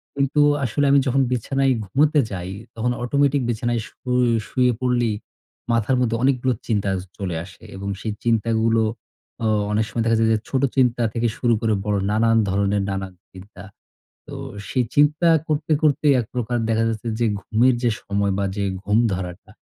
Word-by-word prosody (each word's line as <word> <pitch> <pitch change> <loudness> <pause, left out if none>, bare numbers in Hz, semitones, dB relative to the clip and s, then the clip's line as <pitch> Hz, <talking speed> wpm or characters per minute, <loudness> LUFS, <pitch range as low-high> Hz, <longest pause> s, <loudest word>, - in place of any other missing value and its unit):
কিন্তু 140 +2 +1 0.2
আসলে 145 +5 0
আমি 140 - +6
যখন 135 +2 +2
বিছানায় 135 +2 +1
ঘুমুতে 145 +9 +2
যাই, 90 -2 -5 0.3
তখন 120 +2 -1
অটোমেটিক 140 +2 +2
বিছানায় 120 0 -1
শুই 125 +2 -1 0.2
শুয়ে 125 -1 +2
পড়লেই, 120 -3 +1 0.6
মাথার 115 +3 +2
মধ্যে 115 -2 +1
অনেকগুলো 130 -1 +2
চিন্তা 105 -3 0
য - - -2 0.2
চলে 90 -5 -3
আসে। 95 - -16
এবং 100 +1 -5
সেই 110 - -3
চিন্তাগুলো, 115 0 +2 0.6
অ - - +2 0.2
অনেক 110 +1 +1
সময় 115 - -1
দেখা 115 -1 +3
যায় 110 - +3
যে - - +3
ছোট 130 - 0
চিন্তা 125 -3 +2
থেকে 115 0 0
শুরু 120 -2 +2
করে 110 -2 +1
বড় 105 -1 +1
নানান 115 +1 +3
ধরনের 100 +1 +1
নানা 95 0 -3 0.2
চিন্তা। 95 0 -12 0.6
তো 145 - -9 0.3
সেই 125 - 0
চিন্তা 150 +4 +4 0.2
করতে, 150 0 -1
করতে 150 -1 +2
এক 120 - -2
প্রকার 120 -1 -1
দেখা 115 0 +2
যাচ্ছে, 110 +1 -4
যে 120 - +2 0.2
ঘুমের 115 +6 +2
যে 120 - +3
সময় 100 0 -1
বা 100 - 0
যে 100 - -2 0.2
ঘুম 105 +1 +1 0.2
ধরাটা, 90 -1 -6
115 Hz, 170 wpm, -22 LUFS, 105-130 Hz, 0.6 s, আমি